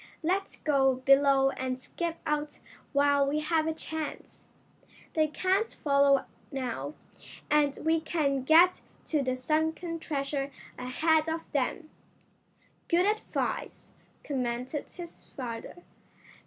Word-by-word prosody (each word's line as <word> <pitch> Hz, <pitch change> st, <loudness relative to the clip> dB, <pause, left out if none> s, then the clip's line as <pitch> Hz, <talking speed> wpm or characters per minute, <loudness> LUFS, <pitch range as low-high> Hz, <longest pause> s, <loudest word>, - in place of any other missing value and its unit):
"Let's 380 Hz, +4 st, 0 dB
go 270 Hz, -3 st, +3 dB
below 270 Hz, +1 st, +4 dB
and 255 Hz, -1 st, -3 dB
skip 335 Hz, +5 st, -4 dB
out 300 Hz, 0 st, -2 dB, 0.3 s
while 285 Hz, -1 st, +3 dB
we 300 Hz, +2 st, 0 dB
have 315 Hz, 0 st, +1 dB
a 320 Hz, -, 0 dB
chance. 315 Hz, -1 st, -6 dB, 0.7 s
They 310 Hz, -1 st, +3 dB
can't 380 Hz, +8 st, +1 dB
follow 280 Hz, -2 st, +4 dB, 0.3 s
now, 265 Hz, +2 st, -4 dB, 0.6 s
and 295 Hz, -2 st, +3 dB
we 325 Hz, 0 st, +3 dB
can 290 Hz, -4 st, 0 dB
get 330 Hz, +7 st, +6 dB, 0.2 s
to 305 Hz, -3 st, +1 dB
the 255 Hz, -1 st, 0 dB
sunken 320 Hz, +5 st, -1 dB
treasure 275 Hz, -2 st, -2 dB, 0.3 s
ahead 310 Hz, +5 st, +1 dB
of 325 Hz, +1 st, -2 dB
them." 300 Hz, +3 st, -1 dB, 1.0 s
"Good 350 Hz, +1 st, +3 dB
advice," 425 Hz, +1 st, -2 dB, 0.3 s
commented 255 Hz, +1 st, -3 dB
his 345 Hz, -2 st, -10 dB
father. 245 Hz, +6 st, -6 dB
295 Hz, 115 wpm, -29 LUFS, 275-320 Hz, 1.0 s, get